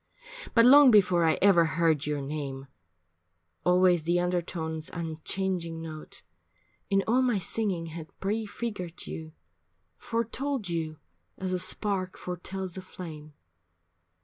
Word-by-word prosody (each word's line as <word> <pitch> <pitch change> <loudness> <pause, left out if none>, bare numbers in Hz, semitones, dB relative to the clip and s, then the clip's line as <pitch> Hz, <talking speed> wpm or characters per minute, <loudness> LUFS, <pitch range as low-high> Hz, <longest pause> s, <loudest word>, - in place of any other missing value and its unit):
But 230 -1 +7
long 280 +2 +9
before 185 -6 +5
I 160 - +3
ever 190 -4 +6
heard 160 -1 +1
your 145 -2 -1
name, 135 -2 -5 1.0
Always 180 -1 +4
the 175 +3 +1
undertone's 170 -3 -2
unchanging 170 +1 -3
note 155 -1 -8 0.7
In 195 -1 +3
all 245 +4 +3
my 245 -4 +2
singing 190 -2 -2
had 160 -1 -7
prefigured 205 -3 -4
you, 160 -1 -7 0.6
Foretold 235 +1 -2
you 160 -2 -3 0.4
as 185 -1 -3
a 180 - 0
spark 185 0 0
foretells 180 +1 -5
a - - -4
flame. 155 -5 -9
180 Hz, 120 wpm, -28 LUFS, 160-195 Hz, 1.0 s, long